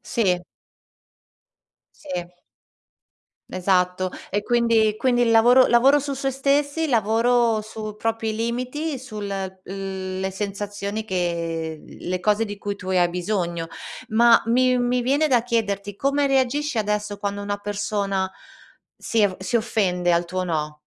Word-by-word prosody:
Sì. 185 -7 0 1.6
Sì. 180 - -4 1.2
Esatto 185 0 +1 0.2
e 205 +1 0
quindi 230 -2 +2
quindi 245 -1 +2
il 235 - +3
lavoro 240 +3 +6
lavoro 270 +5 +5
su 280 0 -3
sé 270 0 -1
stessi, 285 +4 +1
lavoro 230 -1 +2
su 215 0 -7
propri 225 0 -2
limiti, 255 +7 -2
sul 215 -5 -7
le 190 0 -4
sensazioni 205 +1 -4
che 170 -4 -2
le 180 +1 -5
cose 210 +4 +2
di 205 -2 -6
cui 205 0 -4
tu 185 -1 -8
hai 180 -2 +3
bisogno. 175 -2 -2 0.4
Ma 230 +1 +6
mi 250 +1 +3
mi 245 0 +1
viene 285 +5 +2
da 245 -5 +3
chiederti 205 -4 -1
come 280 +4 +1
reagisci 270 0 +1
adesso 210 0 -2
quando 200 0 -3
una 205 0 -2
persona 200 -1 -2 0.7
si 230 - 0
av 200 -3 +2
si 190 +5 -2
offende 185 -6 0
al 170 0 +2
tuo 185 +1 -3
no? 150 -3 -3
210 Hz, 130 wpm, -23 LUFS, 190-240 Hz, 1.6 s, lavoro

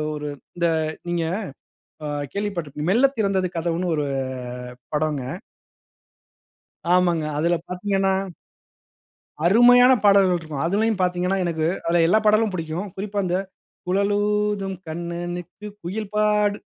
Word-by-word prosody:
ஒரு 150 0 -5 0.3
இந்த, 170 -1 +2 0.4
நீங்க 170 -1 0 0.8
ஆ - - -2 0.2
கேள்விப்பட்டிருப்பீங்க. 170 -7 -3
"மெல்ல 240 +7 +5
திறந்தது 195 -3 +1
கதவுன்னு." 170 +2 -1
ஒரு 150 -1 0 0.9
படம்ங்க. 150 -3 0 1.7
ஆமாங்க. 175 -3 +2
அதில 170 +2 +2
பார்த்தீங்கன்னா 195 +1 0 1.3
அருமையான 245 +5 +7
பாடல்கள் 195 -3 +5
இருக்கும். 155 -3 -5
அதிலையும் 210 +2 +1
பார்த்தீங்கன்னா, 180 +1 +1
எனக்கு 160 -2 0 0.2
அதில 170 0 +3
எல்லா 215 - +5
பாடலும் 215 -1 +4
பிடிக்கும். 170 +4 -4
குறிப்பா 205 +1 -4
அந்த 180 0 0 0.5
"குழலூதும் 205 0 +1
கண்ணனுக்கு 175 +3 -5 0.2
குயில்பாடும் 210 +2 0
185 Hz, 100 wpm, -23 LUFS, 170-205 Hz, 1.7 s, அருமையான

